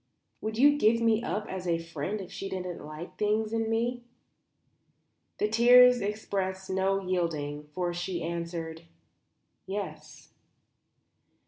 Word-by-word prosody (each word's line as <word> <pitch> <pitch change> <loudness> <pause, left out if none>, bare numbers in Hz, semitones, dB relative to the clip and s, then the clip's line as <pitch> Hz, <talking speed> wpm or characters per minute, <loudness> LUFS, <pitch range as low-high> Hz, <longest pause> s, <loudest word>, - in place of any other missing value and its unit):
Would 220 0 -3
you 290 +3 +5
give 230 0 +4
me 225 -1 +3
up 210 -3 -2
as 185 -1 -5
a 170 -1 +2
friend 165 +4 -4
if 185 - -9
she 195 - -5
didn't 180 -2 -5
like 155 +3 -9
things 215 +1 +1
in 225 -1 0
me?" 240 +2 0 1.4
The 210 - +1
tears 245 +2 +7
expressed 195 -2 -3
no 190 +1 +1
yielding, 160 -6 -2
for 175 -1 -1
she 175 0 -3
answered 165 -1 -4 0.9
"Yes." 200 +1 -6
190 Hz, 125 wpm, -29 LUFS, 170-220 Hz, 1.4 s, tears